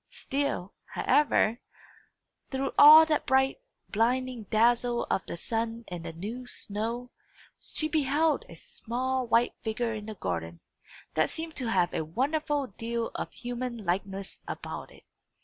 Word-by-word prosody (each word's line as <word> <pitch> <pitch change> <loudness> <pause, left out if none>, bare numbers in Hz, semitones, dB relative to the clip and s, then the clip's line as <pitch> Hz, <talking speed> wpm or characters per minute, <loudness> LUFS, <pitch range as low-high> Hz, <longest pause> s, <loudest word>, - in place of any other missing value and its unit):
Still, 270 -9 -2 0.2
however, 245 -5 +3 0.9
through 270 0 -2
all 310 +2 +10
that 310 -2 0
bright, 265 - +3 0.3
blinding 245 +1 0
dazzle 235 +3 +2
of 190 - +1
the - - -5
sun 230 +4 -3
and 175 -2 -6
the 165 - -5
new 220 +10 -6
snow, 230 +4 -4 0.5
she 310 - -2
beheld 305 0 +2
a 170 - -10
small 255 +8 -3
white 235 +1 +3
figure 225 +1 -1
in 215 -1 -6
the 220 - -6
garden, 85 - -4 0.5
that 155 - +2
seemed 325 0 -5
to 250 -4 -2
have 180 -5 +2
a - - -1
wonderful 285 - 0
deal 230 0 -2
of - - -4
human 240 -2 -5
likeness 195 +2 -2
about - - -6
it. - - -18
235 Hz, 140 wpm, -29 LUFS, 205-265 Hz, 0.9 s, all